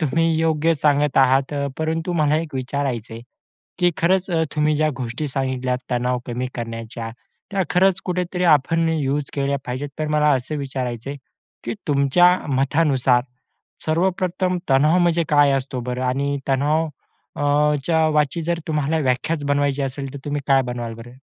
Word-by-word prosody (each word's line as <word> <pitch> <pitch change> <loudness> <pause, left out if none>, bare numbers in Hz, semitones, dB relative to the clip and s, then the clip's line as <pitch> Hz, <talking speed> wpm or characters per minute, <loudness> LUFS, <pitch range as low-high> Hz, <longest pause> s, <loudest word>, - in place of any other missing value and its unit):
तुम्ही 165 +1 +1 0.2
योग्य 160 0 +2
सांगत 145 -1 +1
आहात. 135 +1 +3
अ, 140 -1 -1
परंतु 160 +2 -1
मला 155 -3 +2
एक 160 -3 -7
विचारायचं 130 -3 -3
आहे, 115 - -8 0.6
की 175 -1 +3
खरंच 185 +2 +2
अ, 165 -2 +1
तुम्ही 150 0 +2
ज्या 155 +1 +2
गोष्टी 125 +5 -3
सांगितल्यात 130 -2 -1
तणाव 125 0 0
कमी 125 +1 -3
करण्याच्या. 115 0 -6 0.4
त्या 195 -1 0
खरंच 190 +1 +3
कुठेतरी 180 0 -2
आपण 165 +4 0
यूज 145 -3 -1
केल्या 140 0 0
पाहिजेत. 130 +4 -4
तर 155 - -1
मला 150 0 +3
असं 130 +4 -3
विचारायचंय 130 -1 -4 0.5
की, 120 - -3
तुमच्या 140 +5 +4 0.2
मतानुसार 135 -2 +2 0.6
सर्वप्रथम 180 +2 0
तणाव 150 +6 +4
म्हणजे 170 -1 +2
काय 145 -1 +5
असतो 135 -1 -2
बरं? 125 +1 -3
आणि 140 +3 0
तणाव 150 +4 +1 0.5
अ, 150 +1 +3
...च्या 165 -2 +2
वाची 150 +1 +1
जर 170 +1 -1
तुम्हाला 155 0 0
व्याख्याच 145 +3 0
बनवायची 145 0 +1
असेल, 135 0 -4
तर 140 - -7
तुम्ही 145 0 -2
काय 135 -1 +5
बनवाल 120 -2 -5
बरं? 120 +2 -13
145 Hz, 155 wpm, -21 LUFS, 130-160 Hz, 0.6 s, काय